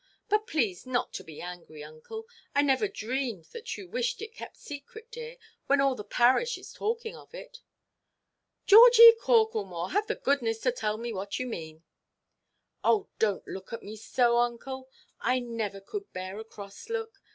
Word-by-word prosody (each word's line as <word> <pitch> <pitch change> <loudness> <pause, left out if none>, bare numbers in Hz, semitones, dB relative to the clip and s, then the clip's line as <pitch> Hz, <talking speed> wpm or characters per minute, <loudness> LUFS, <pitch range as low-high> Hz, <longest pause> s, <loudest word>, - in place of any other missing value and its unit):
But 425 +1 +2
please 225 - -1
not 250 -1 -1
to - - -6
be 155 -2 -10
angry, 175 -4 -9
uncle. 155 - -9 0.3
I 285 - +4
never 285 +9 +2
dreamed 245 - -3
that 470 0 -6
you 385 - -9
wished 485 +4 -2
it 440 0 -7
kept - - -10
secret, 355 - -10
dear, 475 +1 -8 0.3
when 280 0 +4
all 275 -1 +3
the 210 - -7
parish 255 - +3
is - - -12
talking 450 +1 -3
of - - -14
it." - - -11 1.0
"Georgie 465 +2 +10
Corklemore, 435 - +1
have 415 +2 +1
the - - -1
goodness 275 - 0
to 250 - +2
tell 215 -3 -2
me 235 0 -4
what 200 0 -4
you 255 - -2
mean." 160 -8 -7 1.0
"Oh, 415 -2 +2
donʼt 210 -3 +1
look 190 +3 -8
at 230 - -6
me 210 +2 -8
so, 235 +2 +2
uncle. 260 +2 -2 0.3
I 255 +2 +1
never 230 -5 -4
could 400 - -7
bear 185 +2 -5
a - - -6
cross 200 - -11
look. 450 -3 -4
255 Hz, 175 wpm, -29 LUFS, -, 1.0 s, Georgie